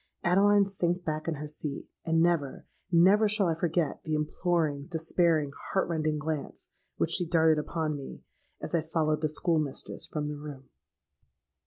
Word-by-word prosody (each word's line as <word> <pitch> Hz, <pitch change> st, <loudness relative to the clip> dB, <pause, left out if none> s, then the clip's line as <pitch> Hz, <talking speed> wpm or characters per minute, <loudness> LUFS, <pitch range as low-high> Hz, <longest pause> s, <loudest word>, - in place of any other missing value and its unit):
—Adeline 200 Hz, +3 st, +4 dB
sank 180 Hz, -2 st, -1 dB
back 155 Hz, 0 st, -3 dB
in 165 Hz, -, 0 dB
her 150 Hz, +1 st, -6 dB
seat: 150 Hz, -1 st, -6 dB, 0.2 s
and 165 Hz, 0 st, +2 dB
never—never 175 Hz, +5 st, +2 dB
shall 205 Hz, -1 st, +1 dB
I 165 Hz, -, +2 dB
forget 165 Hz, -2 st, -1 dB
the 155 Hz, -, -1 dB
imploring, 150 Hz, -1 st, -1 dB
despairing, 165 Hz, -3 st, +1 dB, 0.2 s
heart 190 Hz, -, +2 dB
rending 155 Hz, -2 st, -1 dB
glance 150 Hz, -1 st, -5 dB, 0.3 s
which -, -, 0 dB
she 175 Hz, -, +2 dB
darted 160 Hz, -2 st, +4 dB
upon 155 Hz, 0 st, -2 dB
me, 140 Hz, -2 st, -9 dB, 0.4 s
as -, -, -5 dB
I 170 Hz, -, +3 dB
followed 155 Hz, -1 st, 0 dB
the 155 Hz, -, +1 dB
school 160 Hz, +2 st, +1 dB
mistress 145 Hz, -3 st, -5 dB
from 150 Hz, -1 st, -3 dB
the 150 Hz, 0 st, -4 dB
room. 145 Hz, -3 st, -9 dB
160 Hz, 160 wpm, -29 LUFS, 150-175 Hz, 0.4 s, Adeline